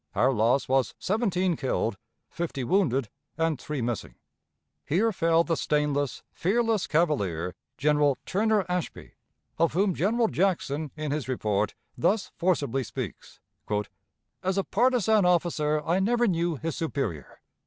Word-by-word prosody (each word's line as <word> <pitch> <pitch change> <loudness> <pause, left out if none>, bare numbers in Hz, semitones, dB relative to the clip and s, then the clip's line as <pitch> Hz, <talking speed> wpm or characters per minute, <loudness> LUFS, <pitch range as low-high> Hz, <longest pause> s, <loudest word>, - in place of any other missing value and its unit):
Our 125 +7 +3
loss 120 +4 +2
was 135 0 +1
seventeen 190 -4 0
killed, 120 -6 -1 0.3
fifty 160 -6 -4
wounded, 135 - +1 0.3
and 160 -4 0
three 150 -5 -3
missing. 115 - -3 0.7
Here 205 +9 +2
fell 165 -3 +3
the 170 -1 0
stainless, 145 -3 0
fearless 225 +2 +1
cavalier, 100 - 0 0.2
General 150 -1 +3
Turner 210 0 +1
Ashby, 180 -2 -4 0.5
of 165 0 +3
whom 190 +2 +2
General 225 +7 +2
Jackson 160 -6 0
in 155 -2 -3
his 145 -2 -2
report 105 -5 0 0.2
thus 195 - +1
forcibly 145 -7 0
speaks: 110 - -7 1.0
"As 190 +1 -1
a 195 - +2
partisan 220 -2 +3
officer 160 -4 +2
I 175 +3 +2
never 240 +5 +2
knew 170 -4 +1
his 160 +2 -4
superior. 135 - -3
165 Hz, 130 wpm, -27 LUFS, 135-190 Hz, 1.0 s, Our